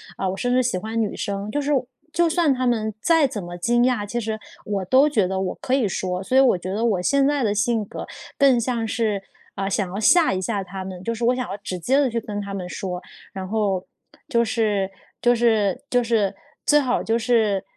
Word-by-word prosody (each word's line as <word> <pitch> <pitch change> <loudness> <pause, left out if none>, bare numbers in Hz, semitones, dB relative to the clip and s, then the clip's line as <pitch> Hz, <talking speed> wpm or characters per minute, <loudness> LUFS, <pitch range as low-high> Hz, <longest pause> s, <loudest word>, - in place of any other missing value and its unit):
啊， 190 - -1
我 190 - -4
甚 245 +4 0
至 255 0 +3
喜 240 -6 0
欢 220 +4 -3
女 210 - -1
生。 200 +1 -3
就 290 - -1
是 290 +1 -1 0.4
就 345 0 +3
算 325 -3 +3
他 255 0 -1
们 220 -3 0
再 325 -4 +4
怎 225 -7 -5
么 175 0 -7
惊 240 +6 +2
讶， 245 -5 +1
其 240 +4 -2
实 220 0 -3 0.3
我 200 -2 -2
都 265 +9 +5
觉 215 -10 +2
得 190 0 -2
我 190 - -2
可 255 - -1
以 265 -5 +3
说。 185 0 -2
所 255 +7 +1
以 - - +8
我 255 -8 +4
觉 185 +1 -5
得， 220 +3 0
我 200 -6 +1
现 275 +8 +3
在 290 -2 +1
的 210 -3 +1
性 215 +2 +1
格 - - -7 0.3
更 270 -4 +5
像 230 -1 -1
是， 215 -3 -1 0.3
啊， 195 -1 -2
想 195 -1 -1
要 195 - -4
吓 335 +9 +5
一 185 - -2
下 200 0 -2
他 190 0 -7
们， 185 -1 -7
就 230 - -1
是 230 +1 -5
我 250 +2 +3
想 255 0 -3
要 - - -4
直 185 -2 -5
接 255 +10 +2
地 280 -3 +3
去 230 0 -1
跟 205 -1 -5
他 200 -1 -5
们 185 -2 -5
说， 180 -1 -4 0.3
然 190 -1 -5
后 195 -3 0 0.4
就 235 0 +2
是 210 -4 0 0.3
就 245 0 +4
是 220 -5 +2
就 245 -1 +2
是 225 -4 +1 0.3
最 295 - +6
好 255 -4 0
就 225 +1 +1
是 220 -5 +2
220 Hz, 255 characters per minute, -23 LUFS, 195-245 Hz, 0.4 s, 以